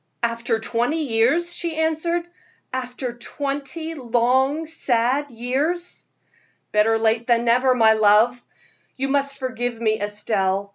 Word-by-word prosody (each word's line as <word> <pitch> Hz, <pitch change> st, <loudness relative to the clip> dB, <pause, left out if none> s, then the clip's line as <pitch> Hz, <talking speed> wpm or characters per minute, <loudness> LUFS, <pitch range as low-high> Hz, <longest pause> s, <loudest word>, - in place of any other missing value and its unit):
"After 230 Hz, 0 st, 0 dB
twenty 245 Hz, +8 st, -1 dB
years!" 275 Hz, +8 st, +1 dB
she 340 Hz, -2 st, -4 dB
answered 320 Hz, +2 st, 0 dB, 0.5 s
"after 250 Hz, -1 st, -4 dB
twenty 285 Hz, +6 st, -5 dB
long, 260 Hz, +3 st, +1 dB
sad 275 Hz, -2 st, 0 dB
years." 275 Hz, +9 st, -3 dB, 0.6 s
"Better 215 Hz, +1 st, +3 dB
late 225 Hz, +1 st, +1 dB
than 235 Hz, -1 st, +2 dB
never, 250 Hz, +2 st, +3 dB
my 220 Hz, -2 st, +5 dB
love. 220 Hz, +3 st, +4 dB, 0.5 s
You 270 Hz, +1 st, -2 dB
must 280 Hz, 0 st, 0 dB
forgive 245 Hz, -3 st, -3 dB
me, 220 Hz, -2 st, 0 dB
Estelle. 200 Hz, -1 st, -1 dB
245 Hz, 115 wpm, -22 LUFS, 230-285 Hz, 0.6 s, my